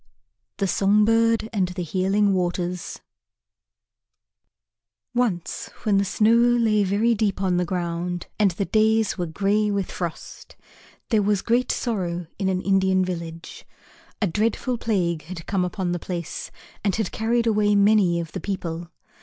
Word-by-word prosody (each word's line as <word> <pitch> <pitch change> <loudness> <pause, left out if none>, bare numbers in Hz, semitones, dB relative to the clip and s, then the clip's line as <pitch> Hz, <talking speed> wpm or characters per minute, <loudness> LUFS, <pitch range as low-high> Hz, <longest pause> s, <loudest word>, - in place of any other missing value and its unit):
THE 195 - 0
SONG 200 +2 +3
BIRD 225 0 +3
AND 190 -4 +1
THE 180 0 -5
HEALING 195 +4 +1
WATERS 180 -1 -2 2.1
Once 225 -9 -1
when 205 -2 +3
the 200 - +1
snow 215 +4 +3
lay 235 -3 +3
very 205 +5 +2
deep 205 -3 0
on 185 -2 +1
the 180 - +1
ground 175 0 -3
and 205 -2 +5
the 190 +3 -3
days 220 -1 +2
were 175 - -1
grey 205 +5 +1
with 200 -2 -2
frost, 170 -3 -7 0.5
there 220 -3 +3
was 205 -1 +1
great 245 +2 +1
sorrow 180 -7 -2
in 195 -2 +1
an 185 -1 -1
Indian 190 -1 +2
village. 170 -2 -6 0.6
A 210 - +2
dreadful 225 +6 -1
plague 170 -9 -1
had 165 -1 -8
come 195 -3 0
upon 180 0 -2
the 175 - -2
place 170 -2 -5 0.3
and 200 -2 +1
had 220 -5 -2
carried 230 +2 0
away 210 -2 +3
many 200 -4 +4
of 165 -2 -5
the - - -5
people. 170 -3 -4
195 Hz, 150 wpm, -24 LUFS, 175-215 Hz, 2.1 s, and